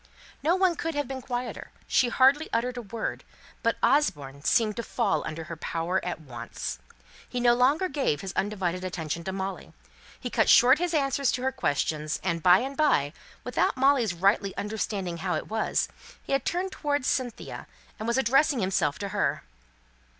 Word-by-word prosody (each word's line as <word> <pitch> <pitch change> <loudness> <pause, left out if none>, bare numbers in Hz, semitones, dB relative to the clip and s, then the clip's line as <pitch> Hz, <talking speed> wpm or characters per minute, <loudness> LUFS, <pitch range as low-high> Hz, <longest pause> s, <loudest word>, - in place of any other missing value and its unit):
No 325 +5 +3
one 375 -2 +3
could 325 -1 -3
have 290 -2 -1
been 265 -1 -5
quieter 245 0 -5 0.2
she 245 - +3
hardly 270 +6 +4
uttered 240 +2 0
a 245 - -4
word; 225 +1 -4 0.4
but - - +1
Osborne 140 - +1
seemed 215 +2 +2
to - - -1
fall 230 -3 0
under 155 +1 -5
her 165 +1 -7
power 165 +3 -2
at 180 -2 -3
once. 120 -6 -6 0.5
He 250 - -3
no 240 0 +5
longer 275 +9 +3
gave 270 - -1
his 190 -1 -5
undivided 185 -3 -1
attention 170 -3 -4
to 190 - -2
Molly. 190 -1 -5 0.5
He - - -5
cut - - +2
short 260 +5 +7
his 350 -1 0
answers 275 -2 +1
to 250 - -2
her 265 - +1
questions; 155 - -1
and 170 -3 -1
by 180 +4 +6
and 270 +2 -4
by, 165 - +2 0.3
without 250 - 0
Molly's 260 -8 +3
rightly 195 +2 +1
understanding 200 -4 -3
how 180 0 -1
it 155 - -4
was, 220 0 0 0.4
he - - -3
had 275 -1 +1
turned 370 +2 -1
towards 290 -5 -1
Cynthia, 250 -3 -3 0.3
and 220 - -4
was 235 +2 +1
addressing 270 +3 +3
himself 185 -7 +1
to 200 - -4
her. - - -1
230 Hz, 180 wpm, -27 LUFS, 180-270 Hz, 0.5 s, short